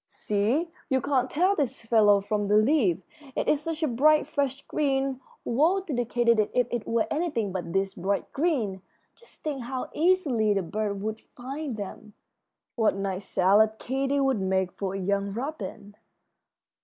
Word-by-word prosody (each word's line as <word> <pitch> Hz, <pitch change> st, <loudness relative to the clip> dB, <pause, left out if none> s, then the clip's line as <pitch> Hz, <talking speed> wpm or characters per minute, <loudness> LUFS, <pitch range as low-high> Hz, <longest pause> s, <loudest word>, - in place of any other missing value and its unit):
"See, 230 Hz, +12 st, -1 dB, 0.2 s
you 265 Hz, -2 st, +3 dB
can't 260 Hz, -2 st, 0 dB
tell 370 Hz, +6 st, +2 dB
this 275 Hz, -7 st, -2 dB
fellow 210 Hz, -3 st, +5 dB
from 205 Hz, 0 st, -1 dB
the 210 Hz, +1 st, +4 dB
leaf, 215 Hz, -, +3 dB, 0.3 s
it -, -, -1 dB
is 300 Hz, -, +3 dB
such 325 Hz, +1 st, -3 dB
a -, -, +3 dB
bright, 300 Hz, +5 st, +4 dB
fresh 280 Hz, -1 st, -2 dB
green. 270 Hz, -3 st, 0 dB, 0.2 s
Woe 315 Hz, +11 st, +3 dB
to 355 Hz, -6 st, -5 dB
the 245 Hz, -1 st, 0 dB
katydid 235 Hz, -2 st, +2 dB
if 250 Hz, -, +4 dB
it 240 Hz, -3 st, -3 dB
were 230 Hz, -1 st, +1 dB
anything 295 Hz, -, -1 dB
but 180 Hz, -2 st, -4 dB
this 195 Hz, +1 st, 0 dB
bright 195 Hz, +3 st, -2 dB
green! 255 Hz, -, 0 dB, 0.3 s
Just 475 Hz, -, -20 dB
think 290 Hz, -4 st, -3 dB
how 255 Hz, +2 st, -5 dB
easily 290 Hz, -, +2 dB
the 195 Hz, -, 0 dB
birds 205 Hz, +3 st, -2 dB
would 220 Hz, +1 st, -3 dB
find 270 Hz, 0 st, -6 dB
them. 210 Hz, +1 st, -8 dB, 0.6 s
What 220 Hz, -4 st, +2 dB
nice 195 Hz, -1 st, -3 dB
salad 205 Hz, +4 st, +4 dB
Katy 270 Hz, +3 st, -1 dB
would 270 Hz, -6 st, +1 dB
make 190 Hz, -1 st, 0 dB
for 195 Hz, 0 st, -4 dB
a -, -, -3 dB
young 200 Hz, +1 st, -1 dB
robin!" 230 Hz, -5 st, -6 dB
235 Hz, 170 wpm, -27 LUFS, 200-280 Hz, 0.6 s, fellow